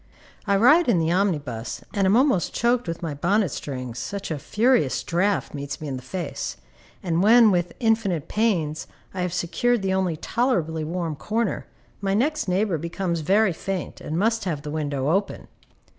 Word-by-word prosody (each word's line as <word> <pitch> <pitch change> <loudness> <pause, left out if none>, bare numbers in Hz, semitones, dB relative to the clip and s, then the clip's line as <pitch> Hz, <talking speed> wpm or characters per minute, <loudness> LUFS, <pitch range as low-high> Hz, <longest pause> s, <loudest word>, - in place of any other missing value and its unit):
I 200 - +3
ride 290 - +5
in 200 - +4
the 165 0 +1
omnibus, 150 - -1
and 200 -3 +2
am 200 +4 +5
almost 255 - +2
choked 240 -2 +1
with 165 +1 -4
my 160 -3 -2
bonnet 185 +7 +1
strings, 125 -5 -5
such 195 - -5
a 155 - -2
furious 225 - +2
draught 190 +4 0
meets 140 -1 -5
me 155 - -6
in 135 - -3
the 130 - -6
face, 165 +5 -5 0.5
and 170 -2 +1
when, 225 +2 +7
with 175 -1 0
infinite 220 - +1
pains, 175 -9 0 0.3
I 185 - -3
have 180 -1 -1
secured 195 +6 0
the 190 -1 +1
only 185 -4 0
tolerably 165 - 0
warm 165 0 -3
corner, 220 +6 -2 0.3
my 195 -1 0
next 295 +4 0
neighbor 185 -2 +1
becomes 170 +1 -2
very 195 +5 +3
faint, 190 +2 -5
and 155 - -3
must 225 +3 +1
have 155 -6 -3
the 150 - -5
window 145 -3 -1
open. 195 +3 -1
185 Hz, 175 wpm, -24 LUFS, 155-215 Hz, 0.5 s, when